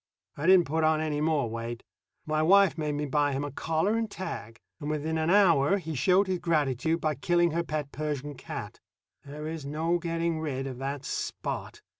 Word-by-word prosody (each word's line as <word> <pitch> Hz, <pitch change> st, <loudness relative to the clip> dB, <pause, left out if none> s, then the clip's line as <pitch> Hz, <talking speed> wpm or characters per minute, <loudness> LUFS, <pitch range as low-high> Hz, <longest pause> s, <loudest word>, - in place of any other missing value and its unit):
I 150 Hz, +4 st, -2 dB
didn't 185 Hz, -2 st, +7 dB
put 160 Hz, +3 st, 0 dB
on 155 Hz, 0 st, +3 dB
any 150 Hz, -2 st, -1 dB
more 155 Hz, -5 st, +1 dB
weight. 115 Hz, +1 st, -5 dB, 0.4 s
My 155 Hz, 0 st, 0 dB
wife 195 Hz, +3 st, +5 dB
made 150 Hz, -2 st, -2 dB
me 145 Hz, +1 st, -2 dB
buy 145 Hz, 0 st, +1 dB
him 135 Hz, +1 st, -1 dB
a 145 Hz, -, -4 dB
collar 160 Hz, -, 0 dB
and 225 Hz, -1 st, -1 dB
tag, 115 Hz, -, -6 dB, 0.2 s
and 145 Hz, -, -4 dB
within 155 Hz, +1 st, -1 dB
an 160 Hz, +1 st, 0 dB
hour 180 Hz, -4 st, +5 dB
he 160 Hz, -4 st, -5 dB
showed 185 Hz, +7 st, +3 dB
his 185 Hz, -2 st, -1 dB
gratitude 160 Hz, -2 st, +1 dB
by 155 Hz, -1 st, 0 dB
killing 175 Hz, +4 st, +2 dB
her 170 Hz, +2 st, 0 dB
pet 150 Hz, -3 st, -3 dB
Persian 145 Hz, -1 st, -3 dB
cat. -, -, -7 dB, 0.4 s
There 150 Hz, +2 st, -8 dB
is 160 Hz, -1 st, -5 dB
no 160 Hz, +5 st, 0 dB
getting 165 Hz, -1 st, -1 dB
rid 135 Hz, -4 st, -3 dB
of 130 Hz, -2 st, -6 dB
that 140 Hz, +1 st, -4 dB
Spot. -, -, -4 dB
155 Hz, 195 wpm, -28 LUFS, 145-170 Hz, 0.4 s, didn't